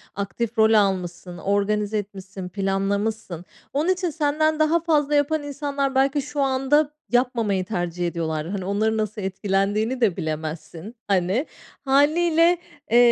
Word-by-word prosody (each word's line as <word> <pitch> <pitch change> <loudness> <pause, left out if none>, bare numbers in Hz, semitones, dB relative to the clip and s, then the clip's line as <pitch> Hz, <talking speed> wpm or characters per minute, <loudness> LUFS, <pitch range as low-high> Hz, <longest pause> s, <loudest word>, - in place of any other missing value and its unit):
aktif 220 +4 -3
rol 220 0 +5
almışsın, 185 -4 0
organize 205 +2 0
etmişsin, 190 -2 -6
planlamışsın. 195 -1 -2 0.3
Onun 300 +6 +1
için 365 -1 +1
senden 310 0 +1
daha 310 +2 +3
fazla 300 -3 +1
yapan 290 +1 +1
insanlar 280 -1 -2
belki 275 +2 +2
şu 290 +1 -3
anda 275 +3 +2 0.2
yapmamayı 230 -6 +1
tercih 175 -3 -2
ediyorlar. 160 -2 -3
Hani 190 -1 -4
onların 215 +3 0
nasıl 215 0 -2
etkilendiğini 200 +5 0
de 205 -7 +2
bilemezsin. 160 +6 -5
Hani 195 - +1 0.4
hâliyle, 325 +5 +4 0.3
eee, 235 - +5
220 Hz, 130 wpm, -23 LUFS, 195-285 Hz, 0.4 s, rol